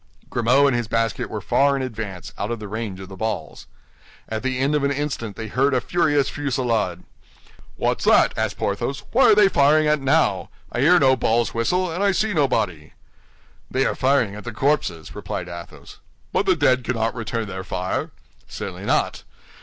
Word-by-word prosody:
Grimaud 125 +4 +3
and 140 -3 +3
his 120 -2 -1
basket 115 +1 -1
were 105 - -5
far 140 +10 +2
in 135 - -2
advance, 110 -7 -6
out 100 - -3
of 120 - -2
the 105 -1 -8
range 105 -2 -5
of 95 - -8
the 95 - -10
balls. 105 -5 -4 0.6
At 110 0 -3
the 130 -1 -2
end 135 +3 +1
of 150 -2 +1
an 140 - +2
instant 140 -7 -3
they 110 - -6
heard 135 +5 +1
a - - +3
furious 145 -1 +1
fusillade. 115 -10 -1 0.7
"What's - - -1
that?" - - +5
asked - - -2
Porthos, 100 +7 -2
"what 260 +3 +5
are 215 - +7
they 210 -1 +6
firing 155 -2 +4
at 150 -1 +2
now? 135 - +1 0.2
I - - -3
hear 170 +7 +6
no 130 -2 +5
balls 120 -1 +1
whistle, 180 +10 0
and 180 +5 -2
I 200 -1 +3
see 215 +2 0
nobody!" 105 - 0 0.8
"They 135 +1 +1
are - - +1
firing 130 -6 +1
at 105 - -8
the 120 - -5
corpses," 110 - -1
replied - - -5
Athos. 85 0 -10 0.3
"But 195 - +1
the 185 - +4
dead 130 -5 +2
cannot 115 -2 -1
return 115 -1 -3
their 95 -1 -6
fire." 90 0 -3 0.4
"Certainly - - -7
not! - - 0
125 Hz, 190 wpm, -22 LUFS, 105-140 Hz, 0.8 s, are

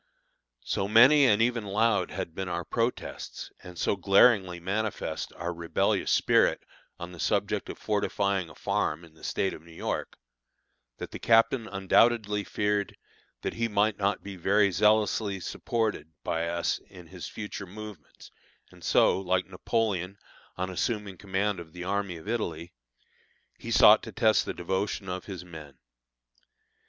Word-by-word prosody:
So 95 - -1
many 130 +7 +7
and 110 -1 +4
even 120 -1 0
loud 105 +2 +1
had 95 -4 -5
been 95 +1 -4
our 85 -1 -3
protests, 115 +6 -3
and 90 -1 -11
so - - +1
glaringly 95 -1 +4
manifest 100 +4 -3
our 85 0 -4
rebellious 85 0 0
spirit - - +3 0.3
on 85 +1 -7
the 90 - -12
subject - - 0
of - - -6
fortifying 100 -3 -1
a - - -14
farm 75 +3 -1
in 80 - -19
the 80 - -20
State 95 - -1
of - - -10
New 85 +1 -16
York, 80 - -4 0.8
that - - -7
the - - -7
captain 115 +1 +3
undoubtedly 105 +2 +2
feared 105 0 -1 0.5
that - - -2
he 115 0 -1
might 105 0 +1
not 100 -1 0
be 100 -1 -7
very 100 +3 +3
zealously 105 +1 +2
supported 110 - -2
by 80 +1 -1
us 85 0 -1
in 90 -3 -13
his 90 +1 -8
future 105 -2 -7
movements, 105 -3 -11 0.4
and - - -17
so, - - +4
like 95 -1 0
Napoleon, 95 -1 -2 0.4
on 95 +1 -2
assuming 105 0 -2
command 100 0 -1
of 80 -2 -11
the 90 0 -7
army 100 -1 -2
of 80 - -13
Italy, 85 -7 -3 0.9
he - - -8
sought - - +7
to - - -8
test - - +3
the - - -3
devotion 95 +2 -2
of 90 0 -4
his 90 -3 -7
men. 75 -6 -11
100 Hz, 155 wpm, -28 LUFS, 90-105 Hz, 0.9 s, many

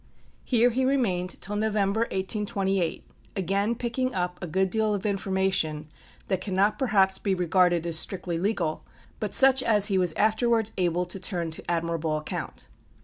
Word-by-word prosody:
Here 245 -1 +3
he 260 +3 0
remained 210 -10 0
till 210 - -4
November, 210 -1 0
1828, 195 -4 -1 0.3
again 200 +4 0
picking 245 +2 -2
up 180 -1 -2
a 180 - -4
good 190 +3 0
deal 220 -1 +1
of 200 - -6
information 190 -6 -1 0.4
that 190 -1 -1
cannot 195 +2 0
perhaps 195 -6 +2
be 195 -2 0
regarded 180 -1 +2
as 165 -2 +2
strictly 180 -2 -2
legal, 180 -5 -1 0.4
but 210 -2 -1
such 265 0 +7
as 210 -4 +4
he 190 -2 +2
was 180 -3 +2
afterwards 220 +2 +1
able 180 -1 0
to 180 +2 -4
turn 175 -4 -2
to 160 - -6
admirable 165 -2 -1
account. 155 - -6
195 Hz, 155 wpm, -26 LUFS, 180-215 Hz, 0.4 s, such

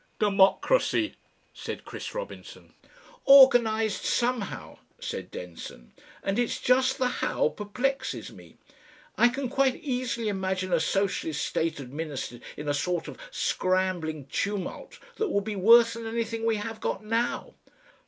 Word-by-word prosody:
"Democracy," 210 - +3 0.4
said - - -7
Chris - - -7
Robinson. - - -8 0.5
"Organised 235 -6 +6
somehow," 240 -4 -2 0.2
said - - -5
Denson. 85 -8 -9 0.3
"And 195 +3 0
it's 245 - 0
just 260 +1 +3
the 255 - +1
How 470 - 0
perplexes 250 - -3
me. - - -15 0.6
I 240 - +5
can 260 +2 -3
quite 265 0 +2
easily 245 -4 -2
imagine 190 -2 -1
a 170 - +4
socialist 165 -3 -1
state 160 -1 -1
administered 140 -2 -6 0.2
in 150 - -6
a 145 - +1
sort 175 +4 -1
of - - -9
scrambling 185 - -1
tumult 200 +6 -4 0.2
that 435 -2 0
would 200 -8 0
be 215 0 -4
worse 230 +4 +6
than 230 0 -6
anything 230 0 -2
we 225 - +2
have 220 +1 -5
got 215 - -3
now. 230 +2 -1
215 Hz, 135 wpm, -27 LUFS, 185-245 Hz, 0.6 s, Organised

